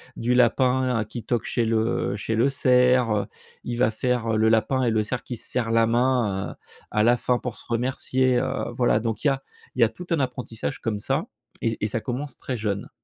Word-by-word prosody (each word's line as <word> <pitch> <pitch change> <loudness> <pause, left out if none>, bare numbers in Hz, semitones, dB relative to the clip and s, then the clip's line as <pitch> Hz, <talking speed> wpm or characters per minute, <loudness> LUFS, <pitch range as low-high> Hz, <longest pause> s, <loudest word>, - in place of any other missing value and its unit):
du 120 +2 0
lapin 125 -1 +3
qui 115 +1 -7
toque 120 -3 -1
chez 120 - 0
le 110 -1 0
chez 110 +2 -3
le 120 +5 +3
cerf, 125 -2 +3
heu, 105 -1 +1 0.4
il 120 -1 -4
va 120 -3 +3
faire 115 -1 0
le 110 +1 +3
lapin 115 +4 +2
et 120 - +2
le 110 -1 +1
cerf 120 +2 -3
qui 120 - -6
se - - -6
sert 120 -3 -1
la 115 0 +4
main, 120 -5 +1
heu, - - -23 0.3
à 105 - +1
la 120 +1 +5
fin 125 0 +1
pour 120 -2 -5
se - - -10
remercier, 130 +1 +1
heu, 130 - -2
voilà. 120 -3 +3
Donc 115 -1 -3
il 150 - +3
y - - +6
a 135 0 -2 0.3
il 130 - -1
y - - +9
a 115 - +4
tout 180 +8 -10
un 165 - +1
apprentissage 125 - -3
comme 115 -3 -2
ça - - -1 0.3
et 115 -1 0
et - - +1
ça 110 +2 -2
commence 130 +3 -4
très 125 - -4
jeune. 105 -2 -3
120 Hz, 230 wpm, -24 LUFS, 110-125 Hz, 0.4 s, y